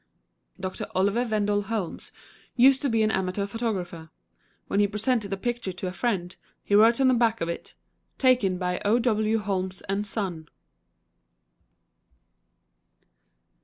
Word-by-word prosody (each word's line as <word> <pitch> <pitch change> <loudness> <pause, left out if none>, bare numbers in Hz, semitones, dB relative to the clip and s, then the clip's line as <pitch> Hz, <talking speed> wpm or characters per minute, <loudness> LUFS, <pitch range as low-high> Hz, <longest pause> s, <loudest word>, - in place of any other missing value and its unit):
Doctor 185 0 -4
Oliver 205 +6 +2
Wendell 205 -1 +1
Holmes 205 -4 -4 0.4
used 260 +2 +5
to 280 - 0
be 225 -2 +2
an 215 - +2
amateur 190 +1 -1
photographer. 190 -7 -4 0.6
When - - -1
he 205 - +4
presented 210 +1 -1
a 195 - -1
picture 235 -1 -3
to 180 +1 -6
a 180 - -2
friend, 185 -4 -2 0.3
he - - -3
wrote 225 +4 +6
on 265 - +4
the 255 - +5
back 230 -2 +2
of 165 - -2
it, 170 - -6 0.4
"Taken 245 -9 +3
by 180 0 -2
O. 210 +3 +3
W. 220 -2 +1
Holmes 190 -3 -3
& 205 - -1
Sun." 180 -7 -4
205 Hz, 140 wpm, -26 LUFS, 185-230 Hz, 0.6 s, wrote